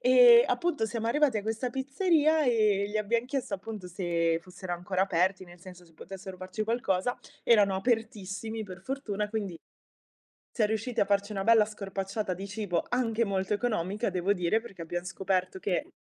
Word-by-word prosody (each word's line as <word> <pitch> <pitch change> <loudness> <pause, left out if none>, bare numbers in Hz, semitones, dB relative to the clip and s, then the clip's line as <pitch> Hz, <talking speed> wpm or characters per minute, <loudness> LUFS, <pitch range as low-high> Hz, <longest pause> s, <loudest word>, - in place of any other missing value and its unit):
ehm, 245 -2 +8
appunto 285 -1 0
siamo 225 0 -3
arrivati 280 0 +2
a - - -5
questa 225 +3 -2
pizzeria, 310 +3 +2
ehm, 215 -5 +3
gli 215 - -2
abbiam 230 +3 0
chiesto 260 -5 -3
appunto 200 0 -7
se 170 -2 0
fossero 180 0 -7
ancora 185 +2 -1
aperti, 185 +1 +1
nel 175 0 -15
senso 180 -1 -12
se 165 -1 -23
potessero 190 +2 -9
farci 185 +4 -4
qualcosa. 230 -1 0 0.3
Erano 205 -5 +4
apertissimi 220 0 -2
per 185 -2 -10
fortuna 210 -4 -3
quindi 205 -6 -3 0.9
siam 215 -3 +1
riusciti 220 +3 -2
a - - +5
farci 200 +1 0
una 195 -1 -2
bella 225 -1 +6
scorpacciata 195 -1 -4
di 195 +3 -7
cibo, 200 -4 -2
anche 235 -2 +1
molto 195 0 -1
economica 210 -1 -1
devo 185 +2 +1
dire, 185 +3 +1
perché 195 -7 -10
abbiam 175 +1 -4
scoperto 190 0 -1
che, 190 - -1
205 Hz, 170 wpm, -29 LUFS, 185-230 Hz, 0.9 s, ehm